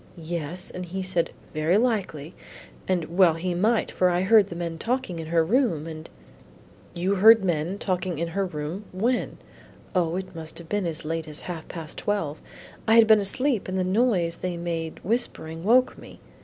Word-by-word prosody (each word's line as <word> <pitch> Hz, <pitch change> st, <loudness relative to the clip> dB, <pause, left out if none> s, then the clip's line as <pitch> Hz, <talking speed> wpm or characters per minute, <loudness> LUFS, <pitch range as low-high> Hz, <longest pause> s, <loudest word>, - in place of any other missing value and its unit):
"Yes, 170 Hz, +1 st, -4 dB
and 180 Hz, -, -6 dB
he 190 Hz, +2 st, -4 dB
said, 180 Hz, -2 st, 0 dB, 0.2 s
'Very 155 Hz, +4 st, +2 dB
likely.' 195 Hz, -, -1 dB, 0.5 s
And 175 Hz, -3 st, -1 dB
well 175 Hz, -4 st, +6 dB
he 175 Hz, +2 st, -2 dB
might, 215 Hz, +6 st, +1 dB
for 185 Hz, -, +2 dB
I 175 Hz, 0 st, +1 dB
heard 205 Hz, +1 st, +5 dB
the 170 Hz, -, -8 dB
men 170 Hz, -1 st, -4 dB
talking 235 Hz, -7 st, -2 dB
in 160 Hz, -, -6 dB
her 165 Hz, 0 st, +2 dB
room, 195 Hz, -, +1 dB
and 160 Hz, -1 st, -8 dB, 0.5 s
" -, -, -25 dB, 0.3 s
"You 180 Hz, +3 st, 0 dB
heard 215 Hz, +1 st, +7 dB
men 170 Hz, +2 st, -1 dB
talking 185 Hz, -3 st, -2 dB
in 170 Hz, +2 st, -2 dB
her 195 Hz, +4 st, -1 dB
room 160 Hz, +5 st, -5 dB
when?" 230 Hz, +7 st, -1 dB, 0.6 s
"O, 175 Hz, -3 st, +1 dB
it 190 Hz, 0 st, -5 dB
must 160 Hz, -1 st, -5 dB
have 170 Hz, -, -5 dB
been 205 Hz, -3 st, 0 dB
as 160 Hz, -2 st, -5 dB
late 165 Hz, 0 st, -3 dB
as 150 Hz, -1 st, -7 dB
half 170 Hz, -3 st, -7 dB
past 160 Hz, -3 st, -7 dB
twelve. 165 Hz, -8 st, -2 dB, 0.5 s
I 220 Hz, -, +5 dB
had 230 Hz, -1 st, +8 dB
been 220 Hz, -1 st, +6 dB
asleep 240 Hz, +4 st, +1 dB
and 185 Hz, 0 st, -2 dB
the 185 Hz, -, +1 dB
noise 185 Hz, -4 st, +1 dB
they 180 Hz, -1 st, -3 dB
made 165 Hz, -2 st, -4 dB
whispering, 170 Hz, -7 st, -3 dB
woke 250 Hz, +5 st, +4 dB
me." -, -, -13 dB
180 Hz, 190 wpm, -25 LUFS, 165-205 Hz, 0.6 s, had